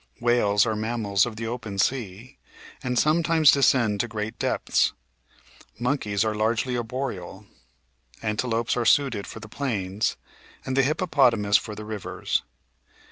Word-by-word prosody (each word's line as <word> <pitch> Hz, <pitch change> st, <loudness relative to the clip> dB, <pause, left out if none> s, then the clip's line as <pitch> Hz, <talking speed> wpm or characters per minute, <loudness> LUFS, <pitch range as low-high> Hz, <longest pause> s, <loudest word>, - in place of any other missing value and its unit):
Whales 115 Hz, -4 st, +3 dB
are 110 Hz, -1 st, -1 dB
mammals 110 Hz, -2 st, 0 dB
of 115 Hz, -, -6 dB
the 115 Hz, +1 st, -5 dB
open 110 Hz, -4 st, -5 dB
sea, 120 Hz, +2 st, -2 dB, 0.4 s
and 125 Hz, -3 st, -2 dB
sometimes 160 Hz, 0 st, +4 dB
descend 120 Hz, -6 st, +3 dB
to 120 Hz, -, 0 dB
great 110 Hz, -1 st, -5 dB
depths; -, -, +1 dB, 0.8 s
monkeys 110 Hz, -5 st, 0 dB
are 110 Hz, -, 0 dB
largely 110 Hz, +4 st, 0 dB
arboreal; 120 Hz, -6 st, -5 dB, 0.7 s
antelopes 115 Hz, +1 st, -1 dB
are 120 Hz, -, 0 dB
suited 120 Hz, -4 st, +2 dB
for -, -, -8 dB
the 110 Hz, -, -10 dB
plains 105 Hz, -6 st, -2 dB, 0.5 s
and 130 Hz, -, -2 dB
the 135 Hz, -, +5 dB
hippopotamus 130 Hz, -, +3 dB
for 105 Hz, -3 st, -6 dB
the 105 Hz, 0 st, -8 dB
rivers. 105 Hz, -2 st, -2 dB
115 Hz, 135 wpm, -25 LUFS, 105-130 Hz, 0.8 s, the